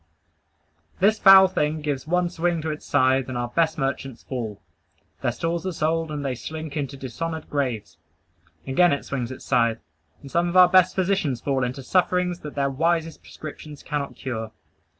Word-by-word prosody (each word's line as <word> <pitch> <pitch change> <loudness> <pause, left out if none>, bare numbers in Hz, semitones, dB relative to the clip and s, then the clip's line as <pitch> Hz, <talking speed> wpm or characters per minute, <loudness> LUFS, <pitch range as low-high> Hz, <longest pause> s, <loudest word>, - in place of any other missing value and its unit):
This 210 +3 +3
foul 195 -1 +9
thing 155 -4 -1
gives 145 -1 -3
one 180 +1 +2
swing 175 0 0
to 160 - -1
its 150 - -8
scythe, 130 -1 +2
and 130 - -3
our 120 0 -2
best 160 +4 +1
merchants 135 -3 -3
fall; 115 -6 -5 0.6
their - - +1
stores 170 0 -2
are - - -1
sold, 160 0 -1
and 145 -2 -4
they 135 - 0
slink 155 +4 -7
into 140 -2 -3
dishonored 160 +5 -5
graves. 115 - -2 0.7
Again 155 +5 +3
it 140 - -3
swings 130 -3 -3
its 130 - -9
scythe, 115 -3 +2 0.5
and 140 - -10
some 175 +1 +1
of 180 - 0
our 180 -1 +8
best 185 0 +5
physicians 185 -9 0
fall 135 0 0
into 125 +2 -3
sufferings 180 +2 +1
that 150 -3 -9
their 140 -1 0
wisest 165 +3 0
prescriptions 150 -1 -10
cannot 145 -2 -3
cure. 110 -4 -5
150 Hz, 175 wpm, -24 LUFS, 130-170 Hz, 0.7 s, foul